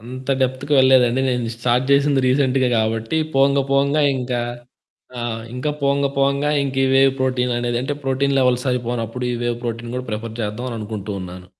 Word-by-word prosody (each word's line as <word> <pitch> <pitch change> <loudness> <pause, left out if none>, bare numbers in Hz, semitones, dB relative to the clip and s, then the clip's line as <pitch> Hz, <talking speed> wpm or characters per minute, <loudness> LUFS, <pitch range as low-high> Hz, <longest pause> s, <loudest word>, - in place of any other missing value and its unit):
అంత 130 +3 -9
డెప్త్‌కి 130 +3 -1
వెళ్ళలేదండి. 130 -1 +4
నేను 125 -2 -1
స్టార్ట్ 125 +2 +1
చేసింది 140 0 +3
రీసెంట్‌గా 130 -1 +2
కాబట్టి 115 +5 -1 0.2
పోంగ 140 +1 +4
పోంగా 140 +2 +2
ఇంకా 125 -1 -2 0.8
ఆహ్ 115 -1 -4
ఇంకా 125 +4 -2
పోంగా 140 0 +2
పోంగా 140 +2 +1
ఇంకి 135 -1 -1
వే 135 - +5 0.2
ప్రోటీన్ 125 -1 0
అనేది 120 0 -1
అంటే 145 +3 -2
ప్రోటీన్ 135 +1 +1
లెవెల్స్ 125 0 +2
అయిపోనప్పుడు 120 0 -3
ఈ - - -2
వే - - 0 0.2
ప్రోటీన్ 115 0 -4
కూడా 125 - -4
ప్రిఫర్ 110 +1 -5
చేద్దాం 110 +4 -4
అని 120 - -5
అనుకుంటూ 105 -1 -6
ఉన్నాను. 90 0 -9
125 Hz, 165 wpm, -20 LUFS, 120-135 Hz, 0.8 s, వే